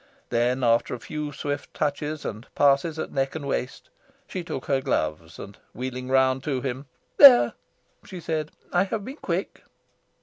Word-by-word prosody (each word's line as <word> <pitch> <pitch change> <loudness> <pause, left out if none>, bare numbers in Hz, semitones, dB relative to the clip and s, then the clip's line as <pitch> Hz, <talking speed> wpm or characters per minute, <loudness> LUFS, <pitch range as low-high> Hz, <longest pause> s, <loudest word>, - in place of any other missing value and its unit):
Then, 125 +2 +1
after 115 +1 +2
a - - -9
few 150 +3 -5
swift 145 0 -5
touches 150 +1 -2
and 110 +3 -6
passes 145 +3 +3
at - - -4
neck 135 +1 -1
and 145 -3 -5
waist, 130 -1 -4 0.3
she 185 - -5
took 135 -6 -5
her 135 -1 +1
gloves 80 -5 -2
and, 100 0 -10 0.2
wheeling 125 +1 -5
round 130 0 +3
to 140 -4 -1
him, 130 +1 -4 0.3
"There!" 270 -4 +9 0.5
she 185 - -9
said, 155 -2 -3 0.2
"I 180 +2 +3
have 200 +1 -4
been 270 +3 -8
quick." - - -3
135 Hz, 165 wpm, -25 LUFS, 125-155 Hz, 0.5 s, There